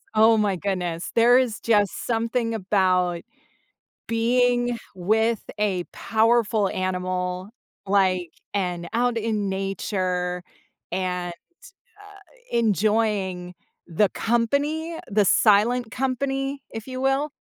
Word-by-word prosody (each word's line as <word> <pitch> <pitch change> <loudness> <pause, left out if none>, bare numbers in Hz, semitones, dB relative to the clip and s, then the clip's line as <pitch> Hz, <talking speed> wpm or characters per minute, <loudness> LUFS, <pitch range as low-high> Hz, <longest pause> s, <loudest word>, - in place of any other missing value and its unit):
Oh, 220 +1 +6
my 205 -3 +1
goodness. 180 -3 -3
There 240 +2 +6
is 245 -5 0
just 205 -4 +1
something 230 0 0
about 185 -4 +1 0.9
being 245 +1 +2 0.2
with 220 +5 +1 0.2
a 195 -4 0
powerful 220 -2 +2
animal, 185 0 -2 0.4
like 185 -3 +2 0.2
and 180 -3 -2
out 240 0 +1
in 210 -3 -1
nature, 185 -2 -2 0.5
and, 180 -1 -2 0.7
uh, 405 -1 -15 0.4
enjoying 205 -4 0 0.3
the 180 +4 +2
company, 290 +8 0
the 205 0 +3
silent 220 +4 +3
company, 270 +2 -2
if 225 -1 -7
you 255 -1 -5
will, 270 +3 +1
215 Hz, 100 wpm, -24 LUFS, 185-240 Hz, 0.9 s, Oh